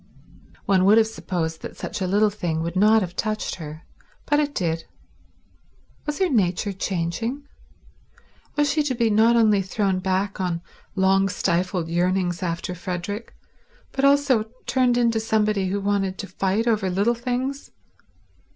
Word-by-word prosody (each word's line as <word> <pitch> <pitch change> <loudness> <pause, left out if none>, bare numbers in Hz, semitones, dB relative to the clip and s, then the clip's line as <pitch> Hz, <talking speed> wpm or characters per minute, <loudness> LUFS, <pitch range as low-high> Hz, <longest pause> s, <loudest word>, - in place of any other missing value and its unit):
One 190 -2 +3
would 210 +3 +6
have 225 - +6
supposed 170 -7 -4
that - - -8
such - - -5
a 185 - 0
little 205 +3 +3
thing 170 -5 -2
would 170 +1 -4
not 215 +3 +5
have 180 -1 -6
touched 215 -1 -2
her, 155 0 -8 0.4
but 295 0 +2
it 290 -1 -1
did. 165 -3 -1 1.2
Was 295 - -2
her 380 - +2
nature 200 - +1
changing? 195 +10 -3 1.1
Was 295 0 +2
she 305 - +2
to 285 -4 -1
be 230 -2 +2
not 225 +3 +5
only 215 -4 +4
thrown 190 0 0
back 190 +1 -1
on 175 -2 -2 0.3
long 195 0 +3
stifled 180 -1 0
yearnings 175 +1 0
after 170 0 -3
Frederick, 180 +5 -5 0.6
but 270 - -3
also 275 -5 +4 0.2
turned 250 -2 +2
into 230 -2 +2
somebody 215 -3 +1
who 200 +2 -1
wanted 195 -1 0
to 200 - -6
fight 195 +4 0
over 215 -5 +1
little 200 +6 +2
things? 255 +3 -3
200 Hz, 150 wpm, -23 LUFS, 180-230 Hz, 1.2 s, would